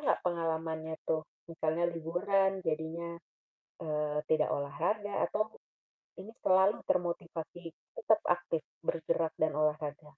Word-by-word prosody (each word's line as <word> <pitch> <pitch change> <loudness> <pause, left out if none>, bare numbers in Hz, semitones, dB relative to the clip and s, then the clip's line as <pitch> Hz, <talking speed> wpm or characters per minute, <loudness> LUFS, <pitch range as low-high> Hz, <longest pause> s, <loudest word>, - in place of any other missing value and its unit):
enggak 295 - +2
pengalamannya 160 -2 -1
tuh, 160 -1 +2 0.3
misalnya 160 +1 0
liburan 190 +4 +1
jadinya, 165 +2 -2 0.6
eee, 150 -1 0
tidak 155 -1 +4
olahraga 205 +9 -1
atau 215 +1 0 0.7
ini 195 - -10 0.2
selalu 190 +2 +5
termotivasi 170 -1 -1 0.3
tetap 220 -1 +4
aktif 175 -2 +1 0.2
bergerak 160 0 +1
dan 155 0 +4
olahraga? 155 -1 0
165 Hz, 105 wpm, -33 LUFS, 155-185 Hz, 0.7 s, selalu